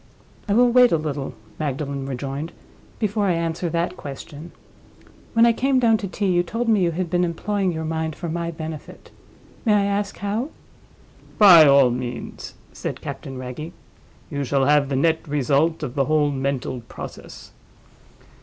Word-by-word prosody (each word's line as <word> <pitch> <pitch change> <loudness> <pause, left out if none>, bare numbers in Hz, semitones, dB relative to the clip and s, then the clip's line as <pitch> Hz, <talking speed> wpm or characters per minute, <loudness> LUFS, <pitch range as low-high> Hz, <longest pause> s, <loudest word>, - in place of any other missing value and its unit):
"I 200 - +3
will 245 +1 +5
wait 250 0 +6
a 165 - +4
little," 145 -3 -4 0.2
Magdalen 140 -2 -3
rejoined, 140 +4 -4 0.4
"before 210 -1 0
I 180 - +3
answer 165 +1 -2
that 170 +2 -1
question. 145 +3 -9 0.8
When 230 +1 +5
I 235 - +5
came 265 +3 +1
down 230 -3 +4
to 200 - -5
tea, 200 +3 -3
you 180 -2 +3
told 230 +7 -3
me 215 -3 +3
you 175 - +3
had 175 +2 -2
been 175 +2 +1
employing 190 +3 -1
your 160 -1 -4
mind 160 -1 -2
for 175 - -6
my 170 +1 -2
benefit. 160 -2 -8 0.5
May 215 -3 +3
I 200 -1 +3
ask 200 0 -2
how?" 210 +7 -2 0.9
"By 175 -7 +9
all 140 -3 +6
means," 125 0 -6 0.2
said - - -5
Captain 135 -1 -7
Wragge. 130 +6 -6 0.6
"You 140 -1 -2
shall 135 0 +1
have 145 -1 +3
the 135 - -1
net 160 +4 +1
result 150 +3 +1
of 130 -5 -4
the 135 -1 +1
whole 150 -1 +2
mental 135 -2 -2
process. - - -10
160 Hz, 165 wpm, -22 LUFS, 140-200 Hz, 0.9 s, By